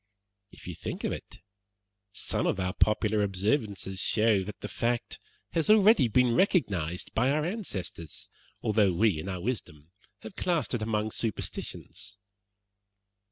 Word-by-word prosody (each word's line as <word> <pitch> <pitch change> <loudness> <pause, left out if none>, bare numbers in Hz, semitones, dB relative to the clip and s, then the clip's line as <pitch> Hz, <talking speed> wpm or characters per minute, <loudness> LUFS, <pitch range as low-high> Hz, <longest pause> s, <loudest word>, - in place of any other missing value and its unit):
If - - -16
you - - -5
think - - -6
of - - 0
it, - - -7 0.7
some 100 - 0
of - - 0
our 90 0 -1
popular 105 0 +2
observances 100 -1 -1
show 110 0 +3
that 105 - -8
the - - -4
fact 120 0 -2 0.3
has 165 +1 0
already 215 - +6
been 125 +2 +3
recognized 100 - +1
by 125 +4 +2
our 150 +2 +1
ancestors, 100 - -5 0.4
although 105 -3 +3
we, 100 -2 +2
in 80 - -5
our 90 -2 -4
wisdom, 85 - -5 0.3
have 110 - -9
classed 165 - 0
it 120 - -1
among 110 0 -1
superstitions." 100 -2 -4
110 Hz, 140 wpm, -29 LUFS, 95-125 Hz, 0.7 s, already